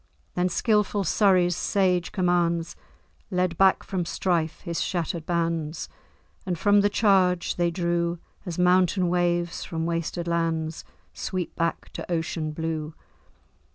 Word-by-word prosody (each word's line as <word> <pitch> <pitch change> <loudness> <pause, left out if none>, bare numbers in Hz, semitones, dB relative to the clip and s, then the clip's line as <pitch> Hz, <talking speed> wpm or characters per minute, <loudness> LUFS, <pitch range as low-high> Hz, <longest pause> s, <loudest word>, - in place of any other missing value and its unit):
Then 180 +1 +1
skilful 210 0 +1
Surrey's 180 -1 +3
sage 185 -3 +1
commands 175 -2 +1 0.5
Led 180 -2 0
back 190 +2 +4
from 185 -2 -2
strife 170 -2 -1
his 170 -1 -3
shattered 170 -2 -2
bands; 165 -2 -1 0.5
And 180 -2 -2
from 205 +3 +4
the 205 - +3
charge 190 -4 +2
they 175 -1 +1
drew, 170 0 -1 0.3
As 175 -4 -5
mountain 180 0 +3
waves, 175 -1 0
from 160 -1 -3
wasted 170 +1 -2
lands, 165 -1 -1 0.3
Sweep 185 -3 -4
back 165 -1 -2
to - - -7
ocean 160 -1 -2
blue. 160 -1 -4
175 Hz, 125 wpm, -25 LUFS, 165-185 Hz, 0.5 s, back